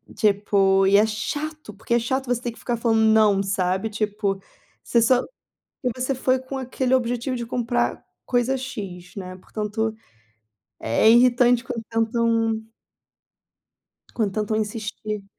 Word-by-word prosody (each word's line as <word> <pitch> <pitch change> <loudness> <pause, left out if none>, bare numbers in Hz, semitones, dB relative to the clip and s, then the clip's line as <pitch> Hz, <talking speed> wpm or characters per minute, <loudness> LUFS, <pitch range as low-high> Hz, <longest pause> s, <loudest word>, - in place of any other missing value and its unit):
tipo 195 -2 +3
e 200 - +6
é 210 - +5
chato, 290 +4 -4
porque 220 +3 -3
é - - +4
chato 260 +3 -1
você 245 -1 0
ter 240 -2 -3
que - - -17
ficar 240 - -2
falando 225 -1 +2
não, 215 -3 +4
sabe. 190 +1 -1
Tipo, 205 -2 -1 0.4
você 235 - +2
só 245 +2 +4 0.6
e 250 - +2
você 255 +2 -1
foi 260 0 +1
com 260 +1 -7
aquele 260 0 -1
objetivo 245 0 0
de 235 - -4
comprar 240 0 -1 0.2
coisa 245 +2 +1
X, 195 -9 -7
né. 185 -1 -7
Portanto, 215 +3 -3 0.9
é 115 - +3
irritante 245 0 +5
quando 235 -3 -5
tentam 225 -1 +1 1.5
Quando 215 -4 0
tentam 215 0 -1
insistir. 210 -1 -4
225 Hz, 140 wpm, -23 LUFS, 210-245 Hz, 1.5 s, e